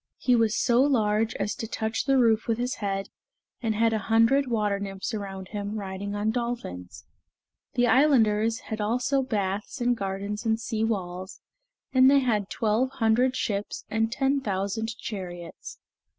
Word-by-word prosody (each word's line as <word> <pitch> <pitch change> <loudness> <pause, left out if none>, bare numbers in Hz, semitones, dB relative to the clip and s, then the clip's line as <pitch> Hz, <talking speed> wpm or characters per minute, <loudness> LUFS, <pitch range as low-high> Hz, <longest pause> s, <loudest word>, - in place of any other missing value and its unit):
He 250 - +3
was 225 -1 +2
so 245 0 +3
large 220 -5 +2
as 205 +1 -1
to 225 - -5
touch 220 0 -2
the 270 0 +3
roof 225 -3 +3
with 225 -1 +1
his 250 +2 -1
head, 195 -1 -3 0.5
and 225 -3 0
had 225 +1 +2
a 220 - +1
hundred 230 +6 +3
water 210 -4 0
nymphs 195 +2 -5
around 195 -3 -5
him, 205 0 -4
riding 200 0 -4
on 210 +1 0
dolphins. 235 - -5 0.7
The 245 - +3
islanders 230 -5 +3
had 215 0 -2
also 250 +6 +1
baths 205 -5 -2
and 245 0 +2
gardens 200 +1 -4
and 225 -1 +1
sea 225 -1 -2
walls, 185 -3 -3 0.5
and 260 0 +7
they 280 - +6
had 215 -6 0
twelve 225 +4 +1
hundred 250 +2 +2
ships 205 -3 -3
and 225 +1 +1
ten 270 +2 +1
thousand 215 +2 -2
chariots. 175 -5 -7
220 Hz, 160 wpm, -26 LUFS, 200-240 Hz, 0.7 s, and